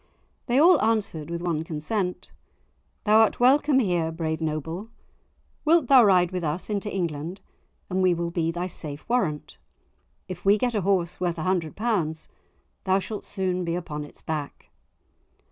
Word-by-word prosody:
They 245 - +2
all 340 +6 +6
answered, 205 -9 0
with 170 0 -4
one 165 -3 -1
consent, 180 +4 -3 0.7
"Thou'rt 220 +1 +4
welcome 275 +3 +4
here, 175 -9 +1
brave 160 -1 -3
Noble; 160 +6 -3 0.7
wilt 315 -4 +3
thou 265 -3 +8
ride 180 -4 +4
with 180 -1 -3
us 160 +7 -3
into 205 0 -2
England, 170 0 -3 0.5
and 185 0 -1
we 180 -1 +3
will 170 0 -3
be 165 -1 0
thy 175 +2 -2
safe 150 -5 -7
warrant? 190 -12 -1 0.7
If 180 -1 -7
we 200 +2 +5
get 245 +2 0
a 210 - 0
horse 180 -3 0
worth 175 -2 -1
a 160 - -3
hundred 175 -4 -1
pounds 180 -9 -1 0.5
thou 190 0 +2
shalt 205 +2 -5
soon 185 -2 -2
be 170 0 -2
upon 150 -4 -5
its 145 - -14
back." 150 -3 -5
180 Hz, 160 wpm, -25 LUFS, 160-210 Hz, 0.7 s, thou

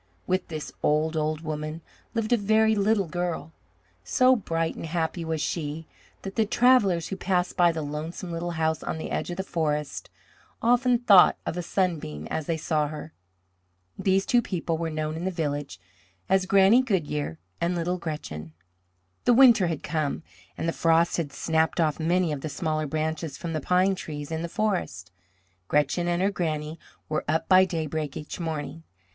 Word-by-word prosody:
With 185 +1 0
this 155 -2 -6
old, 155 +2 +1
old 155 0 -1
woman 155 0 -4 0.3
lived 225 +1 +1
a - - +7
very 220 +1 +3
little 205 -1 +2
girl. 175 -1 -3 0.5
So 255 0 +4
bright 165 -7 -1
and - - -6
happy 165 +1 -2
was 160 -1 -2
she 155 0 -3 0.4
that 195 0 -6
the 225 - +3
travellers 210 -8 +3
who 195 - -3
passed 180 -1 0
by 175 -1 +5
the 160 -1 -4
lonesome 155 +4 -5
little 170 +1 -3
house 160 0 0
on - - -3
the 160 - -6
edge - - -2
of 175 - -5
the 190 - -2
forest 150 -5 -2 0.5
often 245 +1 +3
thought 205 -7 +6
of - - -3
a 180 - -2
sunbeam 165 - -2
as 160 - -2
they 165 - 0
saw 155 -1 0
her. 155 +1 -8 0.8
These 195 0 +1
two 245 - +3
people 175 -6 -2
were 165 0 -2
known 155 0 -3
in 165 - -5
the - - +1
village 145 -5 -3 0.5
as 190 0 +2
Granny 195 +5 +6
Goodyear 150 - -2 0.2
and 170 +1 +1
Little 175 +2 -1
Gretchen. 80 - -6 0.7
The 245 - +5
winter 240 -7 +7
had 165 -3 -3
come 155 -1 -2 0.3
and - - -2
the 165 - 0
frost 165 0 +3
had 160 -5 -2
snapped 160 +4 0
off 155 -2 +1
many 170 +1 +1
of 145 -2 -3
the 155 - -4
smaller 155 0 -2
branches 155 0 -3
from 165 -1 -5
the 155 - -2
pine 185 +5 +3
trees 150 -5 -6
in 160 0 -2
the 170 - -4
forest. 175 - -2 0.6
Gretchen 150 - +1
and 175 +1 +1
her 200 - +2
Granny 155 -3 -3 0.3
were 155 - -1
up 160 +2 0
by 185 0 +7
daybreak 155 -4 -3
each 150 - -7
morning. 160 -1 -4
165 Hz, 180 wpm, -26 LUFS, 155-185 Hz, 0.8 s, a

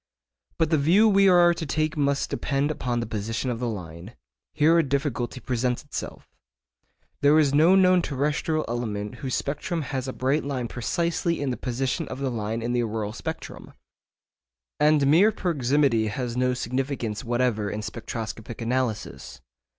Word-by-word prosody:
But 160 0 +1
the 155 - +3
view 180 +10 +5
we 195 -2 +5
are 175 -1 +6
to 170 - -5
take 155 +2 -1
must 140 -2 0
depend 140 +2 0
upon 120 -5 -2
the - - -3
position 115 +3 -3
of 115 - -4
the 120 -1 -1
line. 90 0 -8 0.4
Here 160 +3 +4
a - - +4
difficulty 135 -3 -2
presents 125 0 -1
itself. 145 - -7 0.9
There 145 +2 +5
is 145 -3 +3
no 160 +6 +6
known 185 -1 +5
terrestrial 150 +2 -1
element 105 -4 -4
whose 130 -3 -2
spectrum 155 +3 -2
has 130 -1 -4
a 130 - -4
bright 135 +4 0
line 130 -4 -3
precisely 170 +7 -1
in 140 -2 -1
the - - -2
position 130 +1 -2
of - - -6
the 135 -1 -2
line 110 0 -3
in 120 +1 -1
the 120 - +2
auroral 110 -2 -3
spectrum. - - -7 1.1
And 150 -1 +4
mere 170 +10 +5
proximity 140 - +1
has 120 +2 -3
no 125 0 +1
significance 125 -3 -3
whatever 120 -3 0
in 105 +1 -4
spectroscopic 110 0 -6
analysis. 120 -2 -3
130 Hz, 160 wpm, -25 LUFS, 115-150 Hz, 1.1 s, are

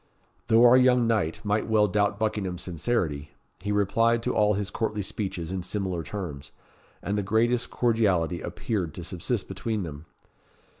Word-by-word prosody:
Though 115 +2 +6
our 120 +1 +8
young 125 -1 +4
knight 105 -6 0
might 105 +1 0
well 105 -1 +4
doubt 100 +1 +1
Buckingham's 100 -5 -2
sincerity; 80 -5 -2 0.3
he 100 +3 -3
replied 115 +3 +2
to - - 0
all 105 -1 +3
his 100 0 -3
courtly 105 -2 -2
speeches 95 -4 -4
in 95 -1 -2
similar 95 -2 -3
terms, 75 -9 -6 0.5
and 100 +1 -1
the - - +1
greatest 115 +4 +1
cordiality 100 -8 +1
appeared 95 -9 -3
to 90 - -6
subsist 95 +5 -2
between 105 +2 -3
them. 75 -1 -8
105 Hz, 155 wpm, -26 LUFS, 90-110 Hz, 0.5 s, our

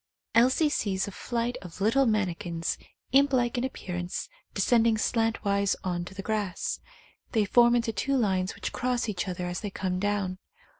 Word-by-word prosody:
Elsie 260 +7 +5
sees 195 -9 0
a - - -5
flight 235 +4 -2
of 180 -1 -10
little 230 +7 +3
manni 210 -5 +2
kins, 165 -1 -3 0.4
imp 275 +2 +5
like 245 -2 +2
in 245 - 0
appearance, 180 -8 -4 0.3
descending 230 -2 +4
slantwise 215 -3 +1
on 175 -2 -1
to 190 - -10
the 195 - -5
grass. 210 -4 -2 0.5
They 220 -3 +3
form 240 +3 +5
into 230 -1 +1
two 275 +5 0
lines 190 -5 +1
which - - -5
cross 250 -1 0
each 200 -2 -2
other 180 -1 -3
as 175 0 -3
they 205 - -3
come 185 -1 -2
down. 200 -2 -1
210 Hz, 170 wpm, -28 LUFS, 185-240 Hz, 0.5 s, Elsie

